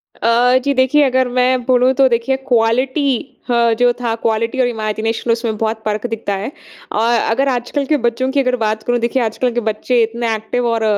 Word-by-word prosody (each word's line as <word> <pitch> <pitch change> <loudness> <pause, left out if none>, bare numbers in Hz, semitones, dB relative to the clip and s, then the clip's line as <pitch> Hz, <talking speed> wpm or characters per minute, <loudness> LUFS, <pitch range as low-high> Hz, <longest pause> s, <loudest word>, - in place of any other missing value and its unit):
अ, 245 +2 +3
जी 280 +1 +1
देखिए 260 +3 +3
अगर 260 -1 +2
मैं 250 0 +1
बोलूँ 255 0 +3
तो 265 +1 +4
देखिए 235 +2 0
क्वालिटी 255 +3 0
ह 235 -1 +3
जो 245 0 +4
था 235 -2 -1
क्वालिटी 230 +3 -1
और 250 - +2
इमेजिनेशन 225 0 -2
उसमें 230 -1 -1
बहुत 220 0 -2
फ़र्क 215 +1 -2
दिखता 225 -3 -3
है। 195 +5 -4 0.4
अ, - - -3 0.3
अगर 270 +5 +1
आजकल 255 +3 -2
के 300 +2 +1
बच्चों 240 +1 -1
की 280 - +1
अगर 255 -2 +1
बात 220 -2 -2
करूँ, 245 0 0
देखिए 235 +2 0
आजकल 235 +3 -1
के 240 - 0
बच्चे 235 +3 0
इतने 230 0 -2
एक्टिव 220 +3 -2
और 230 -1 0
240 Hz, 195 wpm, -17 LUFS, 225-255 Hz, 0.4 s, तो